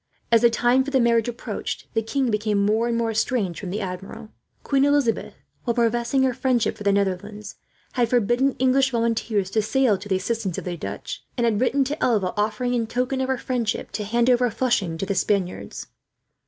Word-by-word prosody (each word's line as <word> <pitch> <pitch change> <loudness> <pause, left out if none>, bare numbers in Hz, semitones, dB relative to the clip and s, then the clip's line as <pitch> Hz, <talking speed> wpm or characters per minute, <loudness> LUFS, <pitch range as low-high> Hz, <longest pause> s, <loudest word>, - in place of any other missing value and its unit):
As 230 -1 +6
the 235 - +6
time 245 +3 +3
for 280 - -5
the 270 -1 +2
marriage 235 -1 +3
approached, 240 0 -5
the 225 - +1
king 255 +2 -1
became 210 -1 +1
more 220 +3 +2
and 235 -1 0
more 230 -1 0
estranged 220 -5 -1
from 190 - -6
the 205 +4 -3
Admiral. 195 +4 -7 0.3
Queen 275 -1 +2
Elizabeth, 285 -5 +1 0.3
while 235 -2 -1
professing 235 +3 +1
her 260 -1 +2
friendship 250 -2 +1
for - - -16
the 200 - +3
Netherlands, 200 +1 -2 0.4
had 240 -3 +1
forbidden 245 +3 +2
English 260 +1 +3
volunteers 230 -5 0
to 220 - +2
sail 220 -2 +2
to 205 +2 -10
the 190 - +2
assistance 200 -2 -2
of - - -5
the 180 -1 -3
Dutch; 105 -1 -6
and 240 - +2
had 225 -1 +1
written 275 +2 +2
to 290 +4 -3
Alva 205 -7 +1
offering, 215 +4 0
in 230 -2 0
token 250 +3 -1
of 260 - 0
her 265 -1 0
friendship, 240 -3 -2
to 210 - -3
hand 235 +3 +1
over 250 -1 +4
Flushing 205 -8 0
to 195 - -2
the 200 - -1
Spaniards. 195 -2 -1
230 Hz, 205 wpm, -23 LUFS, 205-250 Hz, 0.4 s, As